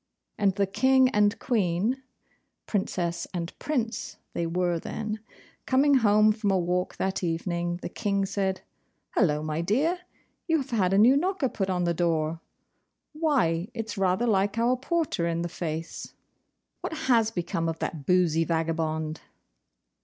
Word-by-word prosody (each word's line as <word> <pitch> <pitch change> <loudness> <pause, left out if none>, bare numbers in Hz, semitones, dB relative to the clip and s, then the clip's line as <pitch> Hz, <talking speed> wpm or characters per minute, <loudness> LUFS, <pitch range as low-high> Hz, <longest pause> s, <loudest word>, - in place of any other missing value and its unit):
And 195 -2 +2
the 200 -1 +2
King 260 +6 +4
and 210 -2 +2
Queen 215 +2 0 0.6
(Princess 175 -4 -2
and 170 -1 -3
Prince 245 -6 -2 0.2
they 170 - -1
were 175 0 0
then) 215 +5 -4 0.5
coming 275 +2 +4
home 215 -2 +5
from 215 -1 -1
a 195 - +3
walk 180 +1 -1
that 190 0 -2
evening, 175 +1 -1
the - - -2
King 200 0 -1
said, 190 -1 -1 0.5
'Hullo, 150 -7 +2
my 155 +1 -2
dear! 280 - +1 0.5
you 325 -1 +3
have 275 -3 -5
had 195 -6 +2
a 195 - +3
new 235 +6 +7
knocker 340 -3 +1
put 195 -4 -2
on 180 -1 0
the 170 0 +1
door. 165 -1 0 0.7
Why, 255 - +1
it's 225 -1 -4
rather 190 +3 +1
like 205 -1 +1
our 240 +2 +3
porter 285 - -1
in 170 0 -1
the 175 - -3
face! 165 -1 -5 0.6
What - - -4
has 230 -4 +4
become 170 -4 -2
of 165 - -3
that 150 -4 -5
boozy 175 -3 +3
vagabond? 160 -1 -1
190 Hz, 150 wpm, -27 LUFS, 170-230 Hz, 0.7 s, new